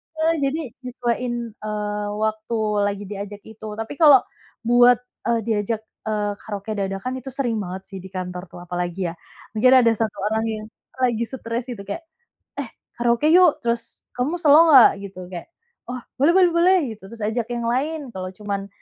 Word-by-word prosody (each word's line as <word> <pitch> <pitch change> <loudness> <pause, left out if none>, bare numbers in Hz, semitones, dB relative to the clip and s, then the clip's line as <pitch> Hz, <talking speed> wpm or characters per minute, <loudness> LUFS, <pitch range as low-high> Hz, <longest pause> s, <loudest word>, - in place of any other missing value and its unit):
heeh, 320 +1 +2
jadi 280 +3 0 0.3
nyesuaiin, 245 0 -2 0.3
eee, 210 -1 -3 0.2
waktu 220 +1 -1 0.3
lagi 200 0 -3
diajak 205 0 -6
itu 220 0 -10
tapi 225 +4 -5
kalau, 290 -6 +8 0.4
buat, 245 +1 +5 0.2
eee, 235 -1 +2
diajak, 220 0 -1 0.3
eee, 210 -1 0
karaoke 205 0 -6
dadakan 195 +7 -3
itu 255 - -15
sering 240 -6 0
banget 190 -1 -5
sih 195 - -6
di 190 - -9
kantor 180 -1 -6
tuh 175 - -11
apalagi 175 0 -3
ya, - - -9 0.4
mungkin 250 +4 +4
ada 230 - +5
1 220 -2 -1 0.2
orang 220 0 +1
yang 215 -1 -4 0.4
lagi 235 -2 +2
stres 235 -1 -4
gitu 235 -6 -6
kayak, 200 - -5 0.7
"Eh, - - -50
karaoke 240 +5 +3
yuk!" 340 -3 +5
Terus, 235 -1 -2
"Kamu 255 +7 0
selo 315 +2 +7
nggak?" 265 -6 +9
Gitu, 195 -2 -8
kayak, 175 - -7 0.4
"Wah, 250 0 -4 0.2
boleh 290 +6 +5
boleh 365 -2 +6
boleh," 360 +2 +5 0.2
gitu 205 -2 -14
terus, 230 - -10
"Ajak 225 +2 -1
yang 235 -1 -2
lain, 290 +7 0
kalau 185 -1 -4
cuman 200 -1 -4
225 Hz, 170 wpm, -23 LUFS, 205-255 Hz, 0.7 s, nggak